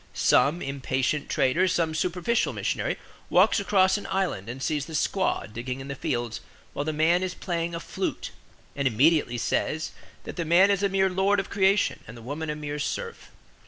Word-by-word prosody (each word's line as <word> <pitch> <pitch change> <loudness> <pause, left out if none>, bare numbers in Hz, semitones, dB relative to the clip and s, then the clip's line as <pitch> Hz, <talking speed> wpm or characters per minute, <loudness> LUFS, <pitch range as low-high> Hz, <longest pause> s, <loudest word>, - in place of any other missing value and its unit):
Some 160 +5 +3
impatient 135 +1 -1
trader, 170 +9 +2
some 165 -3 0
superficial 180 +8 0
missionary, - - -2 0.3
walks - - +4
across 190 -1 +3
an - - -8
island 180 - -1
and 125 +3 -6
sees 145 +1 -1
the 160 - -9
squaw 190 +5 0
digging 125 +3 -4
in 135 +1 -8
the - - -2
fields 120 -3 -3 0.3
while - - -2
the 155 - 0
man 160 +4 +3
is 185 -1 -3
playing 170 -2 -3
a - - -3
flute; - - -4 0.4
and 140 -1 +1
immediately 130 +1 +3
says 155 +6 -1 0.3
that - - -8
the 170 - 0
man 175 +5 +5
is 200 -1 +1
a 200 - +2
mere 190 0 +2
lord 190 +2 +2
of 195 - -4
creation 195 0 +2
and 115 +2 -10
the 115 - -12
woman 150 +5 -4
a 150 - -2
mere 150 -1 -5
serf. 460 - -4
160 Hz, 190 wpm, -26 LUFS, 135-190 Hz, 0.4 s, man